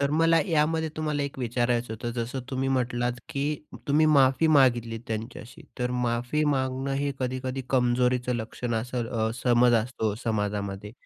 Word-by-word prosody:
तर 140 0 +1
मला 165 +2 +4
यामध्ये 160 -1 +1
तुम्हाला 150 -2 -1
एक 140 -1 -5
विचारायचं 120 -1 0
होतं 115 +2 -4
जसं 120 +2 -3
तुम्ही 135 0 -1
म्हटलात, 125 -2 0 0.2
की 140 -4 -2 0.4
तुम्ही 150 +2 +4
माफी 135 +3 +4
मागितली, 120 -4 +3
त्यांच्याशी 115 +2 -6 0.2
तर 125 0 -1 0.2
माफी 120 +6 0
मागणं 135 -1 0
हे 140 0 0
कधी-कधी 130 +1 -3
कमजोरीचं 125 0 +2
लक्षण 115 +1 -4
असं 120 +1 -2
अ, 110 0 +1
समज 120 -1 +4
असतो 110 -3 -2
समाजामध्ये. 105 -2 -2
125 Hz, 145 wpm, -27 LUFS, 120-135 Hz, 0.4 s, मला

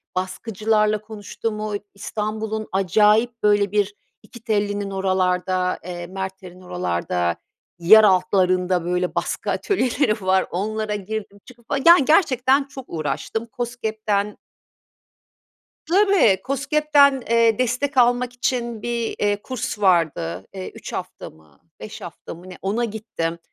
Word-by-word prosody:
baskıcılarla 210 +3 0
konuştum, 215 0 -5
o 215 -1 -3 0.2
İstanbul'un 215 +1 -4
acayip 210 +5 +2
böyle 205 -1 +3
bir 205 -1 0 0.3
İkitelli'nin 205 -3 -2
oralarda, 185 -1 0
eee, 175 0 -6
Merter'in 190 -1 -7
oralarda 90 - -2 0.4
yer 215 +6 +8
altlarında 185 -2 +2
böyle 180 0 -1
baskı - - -2
atölyeleri 250 - 0
var. 190 0 +2
Onlara 215 +3 -2
girdim 205 0 -6
çıkıp 240 -2 -17
fa 285 - 0
yani 335 -4 +8
gerçekten 275 -4 +3
çok 275 -2 -10
uğraştım. 170 +8 -3
KOSGEB'den 220 -4 -3 1.5
Tabii, 370 - +4
KOSGEB'den, 280 0 +3
eee, 230 -2 +4
destek 255 +3 -1
almak 245 0 +3
için 240 -2 -2
bir, 235 -1 -2
eee, 205 0 0
kurs 250 -4 -4
vardı. 160 - +1
Eee, 190 -1 -6
3 - - -9
hafta - - -6
mı 80 -3 -23 0.2
5 - - -9
hafta - - -9
mı 175 +3 -13
ne 180 - -10
ona 215 +5 0
gittim. 205 -7 -4
210 Hz, 120 wpm, -22 LUFS, 185-235 Hz, 1.5 s, yer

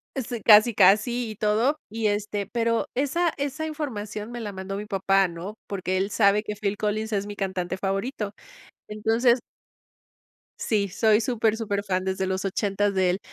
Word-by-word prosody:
Y 270 - -1
sí. 240 -2 -5
Casi, 215 +2 +7
casi 220 +4 +4
y - - -8
todo 220 +8 +1
y, 220 0 -1
este, 205 -1 -1
pero 230 +1 0
esa 315 +6 +1
esa 285 +2 -3
información 225 -8 -5
me 240 - -6
la 210 -2 -4
mandó 190 0 -6
mi 205 - -5
papá, 195 -1 +2
¿no? 175 +5 -7
Porque 185 -1 -2
él 195 +2 -1
sabe 205 0 +3
que 210 -1 -5
Phil 205 0 -2
Collins 215 +1 -2
es 200 -1 0
mi 205 0 -7
cantante 185 -2 -3
favorito. 200 +3 -3 0.6
Entonces 225 +4 +2 1.2
sí, 205 -3 0
soy 210 +3 +3
súper, 220 -1 +1
superfán 200 -4 -2
desde 190 0 -1
los 190 +1 -2
80 200 +1 0
de 185 -2 +2
él. 185 - -2
210 Hz, 170 wpm, -25 LUFS, 195-230 Hz, 1.2 s, Casi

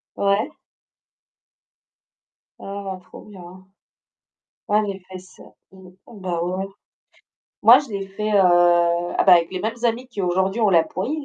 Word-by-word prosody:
Ouais. 200 +8 0 2.1
Oh, 195 -1 -6
trop - - -14
bien! 185 -2 -14 1.0
Ah 210 +1 +2
les 200 -2 -4
fesses. 185 0 -13 0.3
Mmh. 190 -1 -15 0.2
Bah 180 -5 -4
ouais. 185 +2 -3 1.0
Moi, - - +8
je 280 - -6
l'ai 195 -2 -5
fait, 210 +2 -4
heu, - - +1
ah, 175 -1 +3
bah, 190 - +7
avec 170 -1 +2
les 185 - -4
mêmes 220 +3 -3
amis 235 +2 -1
qui 230 -5 -7
aujourd'hui 190 +4 0
ont 215 - +3
la 165 -3 +4
pouille. 280 +11 -4
190 Hz, 140 wpm, -21 LUFS, 180-210 Hz, 2.1 s, Moi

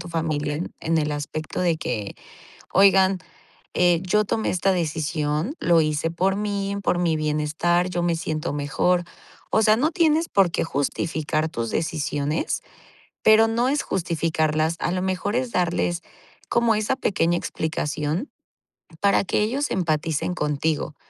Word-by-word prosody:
tu 175 - -8
familia, 155 -3 -2 0.2
en 165 0 +1
el 150 -1 0
aspecto 150 +3 -4
de 170 -3 +2
que: 105 -10 -4 0.6
"Oigan, 190 -1 +5 0.6
eh, 175 -2 +3
yo 210 +3 +2
tomé 220 +2 -1
esta 190 +1 +1
decisión. 155 - -1
Lo 170 -1 +4
hice 155 +1 0
por 185 +3 +1
mí, 200 -1 -2
por 180 - +1
mi 170 -2 +1
bienestar. 155 +4 0
Yo 175 - -1
me 170 -1 +1
siento 155 -2 -3
mejor". 160 +5 +1 0.5
O - - +5
sea, 215 0 +5
no 295 +7 +1
tienes 325 -1 +2
por 195 -3 +4
qué - - -1
justificar 155 +1 -1
tus 115 -5 -3
decisiones, 150 -1 -1 0.6
pero 220 +1 +6
no 235 +3 +1
es 290 +1 +1
justificarlas, 160 -2 0
a - - 0
lo 185 - -1
mejor, 190 +3 -1
es 250 0 0
darles 175 -2 0 0.5
como 235 -2 +3
esa 215 +4 0
pequeña 175 -8 +1
explicación, 155 - -3 0.7
para 200 0 +3
que 195 - 0
ellos 265 +7 0
empaticen 160 -1 -1
contigo, 150 -1 -1
170 Hz, 145 wpm, -23 LUFS, 155-195 Hz, 0.7 s, pero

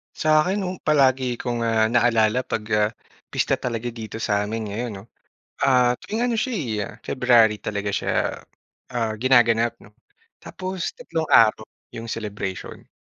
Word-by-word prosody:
Sa 155 -1 +3
akin 190 +4 -1
noong 185 -2 -4
palagi 130 -4 +2
kong, 120 -2 -2
ah, 110 -1 +2
naalala 115 0 +2
'pag 105 - -3
ah, 105 0 +2 0.4
pista - - +1
talaga 120 -1 -4
dito 110 -2 -7
sa'min 105 +1 -1
ngayon 115 +4 -4
'no. 95 -2 -9 0.6
Ah, 125 -2 +4
tuwing 230 +3 -1
ano 240 - 0
siya 250 +3 -1
eh, 110 - -3
February 120 -4 +3
talaga 100 -1 -2
siya, - - -1 0.5
ah, 115 -3 -1
ginaganap 115 -1 +3
'no, 105 - -18 0.5
tapos 185 -1 -4
3 160 -1 -3
araw 110 -1 +5 0.3
yung 115 0 -6
celebration. 100 -4 -6
115 Hz, 145 wpm, -23 LUFS, 110-130 Hz, 0.6 s, araw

